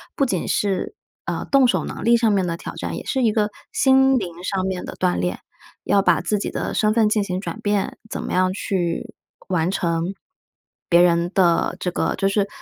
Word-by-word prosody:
不 275 - +2
仅 190 -9 -2
是， 200 - -1 0.3
呃， - - -3
动 275 -2 +6
手 245 - +1
能 - - -6
力 235 +1 +6
上 230 -2 +3
面 190 -3 +1
的 170 - -2
挑 - - -7
战， - - -4
也 - - -7
是 265 - -1
一 225 - +4
个 210 -1 +1 0.2
心 265 0 +4
灵 175 -6 -5
上 190 -1 -1
面 190 -1 -3
的 - - -7
锻 90 - +1
炼。 90 +1 -2 0.4
要 200 - +3
把 - - +3
自 210 - 0
己 - - -3
的 - - -3
身 215 -1 +2
份 220 -2 +3
进 210 -1 +1
行 185 -2 -3
转 215 - -6
变， 205 -2 -1
怎 - - -4
么 - - -5
样 185 0 +2
去 180 -4 -2 0.4
完 175 -2 +1
成， 170 -1 -1 0.8
别 170 0 +6
人 170 0 +3
的 175 -3 +2
这 180 - -2
个 - - -1
就 195 - +1
是 200 0 +1
195 Hz, 230 characters per minute, -22 LUFS, 175-215 Hz, 0.8 s, 动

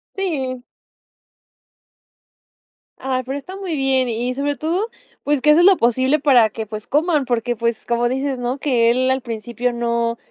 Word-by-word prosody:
Si. 270 -10 -3 2.4
Ay, 255 -1 -2
pero 270 +2 -3
está 370 +7 -9
muy 370 -5 -4
bien, 265 -2 +1
y 240 +2 -2
sobre 285 +2 -2
todo, 345 +9 -1 0.4
pues 290 -2 0
que 300 - +5
haces 335 +3 +5
lo 390 0 +7
posible 260 +3 +2
para 250 -7 +5
que, 220 +2 -6
pues 215 0 -8
coman, 300 -1 +1
porque, 240 -1 -1
pues 235 -1 -2
como 240 0 +1
dices, 265 +1 -2
¿no? 245 +2 -2
Que 245 -5 +2
él 255 +2 +2
al 260 0 0
principio 240 +1 -3
no 235 0 -1
255 Hz, 165 wpm, -20 LUFS, 235-285 Hz, 2.4 s, lo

